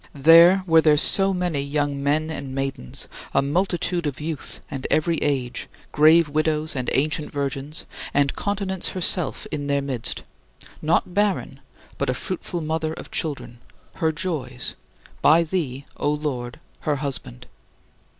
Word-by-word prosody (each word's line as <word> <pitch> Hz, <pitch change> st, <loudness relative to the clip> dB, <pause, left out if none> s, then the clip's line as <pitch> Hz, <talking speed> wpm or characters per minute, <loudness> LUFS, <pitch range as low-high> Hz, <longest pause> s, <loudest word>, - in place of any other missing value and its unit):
There 165 Hz, +6 st, +7 dB
were 165 Hz, -2 st, +5 dB
there 155 Hz, -2 st, +4 dB
so 195 Hz, +6 st, +6 dB
many 180 Hz, -6 st, -1 dB
young 145 Hz, 0 st, -1 dB
men 155 Hz, +3 st, 0 dB
and 135 Hz, -4 st, -6 dB
maidens, 135 Hz, -, -3 dB, 0.3 s
a 135 Hz, -, +4 dB
multitude 175 Hz, +2 st, 0 dB
of 140 Hz, -3 st, -4 dB
youth 155 Hz, -1 st, -5 dB
and 135 Hz, -1 st, -4 dB
every 165 Hz, +1 st, +2 dB
age, 130 Hz, -5 st, -2 dB, 0.2 s
grave 155 Hz, +2 st, +5 dB
widows 155 Hz, +1 st, 0 dB
and 130 Hz, -2 st, -2 dB
ancient 150 Hz, +2 st, 0 dB
virgins; 140 Hz, +2 st, -2 dB, 0.3 s
and 140 Hz, -1 st, +1 dB
continence 195 Hz, -2 st, -1 dB
herself 180 Hz, -3 st, +1 dB
in 145 Hz, -2 st, -3 dB
their 140 Hz, -1 st, 0 dB
midst: 130 Hz, -5 st, -3 dB, 0.6 s
not 165 Hz, +3 st, +1 dB
barren, 205 Hz, 0 st, 0 dB, 0.4 s
but -, -, 0 dB
a -, -, 0 dB
fruitful 185 Hz, -2 st, -4 dB
mother 160 Hz, 0 st, -2 dB
of -, -, -10 dB
children 140 Hz, -6 st, -2 dB, 0.4 s
her 160 Hz, -3 st, +1 dB
joys 150 Hz, -7 st, -3 dB, 0.5 s
by 165 Hz, +2 st, +6 dB
thee, 150 Hz, -6 st, -3 dB
O -, -, 0 dB
Lord, 145 Hz, -4 st, -3 dB, 0.2 s
her 150 Hz, -2 st, -1 dB
husband. 135 Hz, -, -4 dB
150 Hz, 140 wpm, -23 LUFS, 140-170 Hz, 0.6 s, There